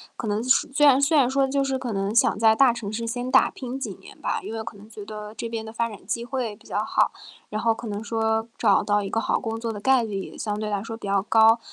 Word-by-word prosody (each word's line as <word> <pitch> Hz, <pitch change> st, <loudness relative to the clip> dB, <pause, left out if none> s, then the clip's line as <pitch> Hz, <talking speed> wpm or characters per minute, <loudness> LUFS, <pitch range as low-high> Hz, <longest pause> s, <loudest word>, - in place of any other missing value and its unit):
可 225 Hz, -, -5 dB
能 210 Hz, +1 st, 0 dB
虽 270 Hz, +3 st, +3 dB
然 275 Hz, -1 st, +6 dB
虽 300 Hz, +2 st, +3 dB
然 260 Hz, -3 st, +5 dB
说， 270 Hz, +1 st, +2 dB
就 275 Hz, +1 st, +1 dB
是 265 Hz, -1 st, -1 dB
可 245 Hz, -3 st, -4 dB
能 195 Hz, +1 st, -1 dB
想 230 Hz, -, +3 dB
在 220 Hz, 0 st, +5 dB
大 265 Hz, -1 st, +6 dB
城 215 Hz, -3 st, -6 dB
市 230 Hz, +1 st, -3 dB
先 245 Hz, +2 st, -3 dB
打 265 Hz, -, +5 dB
拼 260 Hz, 0 st, -6 dB
几 -, -, -5 dB
年 -, -, -15 dB
吧， -, -, -1 dB
因 225 Hz, -, -6 dB
为 220 Hz, -1 st, -4 dB
可 205 Hz, -, -8 dB
能 210 Hz, +2 st, -14 dB
觉 215 Hz, -2 st, -10 dB
得 210 Hz, 0 st, -8 dB
这 230 Hz, +1 st, -5 dB
边 225 Hz, -1 st, -4 dB
的 220 Hz, -, -9 dB
发 230 Hz, 0 st, -1 dB
展 205 Hz, -3 st, -12 dB
机 235 Hz, +3 st, -2 dB
会 245 Hz, -4 st, -3 dB
比 -, -, -20 dB
较 -, -, -3 dB
好， -, -, +2 dB, 0.4 s
然 215 Hz, -, -3 dB
后 230 Hz, 0 st, +2 dB
可 230 Hz, 0 st, -8 dB
能 205 Hz, +1 st, -4 dB
说 225 Hz, 0 st, 0 dB
找 -, -, +3 dB
到 205 Hz, 0 st, +2 dB
一 195 Hz, -, -4 dB
个 225 Hz, -, 0 dB
好 -, -, 0 dB
工 225 Hz, -2 st, -4 dB
作 230 Hz, -1 st, -3 dB
的 205 Hz, -, -6 dB
概 260 Hz, +2 st, +3 dB
率 205 Hz, -3 st, -3 dB
也 -, -, -10 dB
相 210 Hz, -1 st, -3 dB
对 215 Hz, -, -3 dB
来 205 Hz, -1 st, -2 dB
说 225 Hz, 0 st, -6 dB
比 225 Hz, -, -8 dB
较 195 Hz, -1 st, +1 dB
高。 225 Hz, +1 st, +5 dB
225 Hz, 310 characters per minute, -24 LUFS, 210-245 Hz, 0.4 s, 然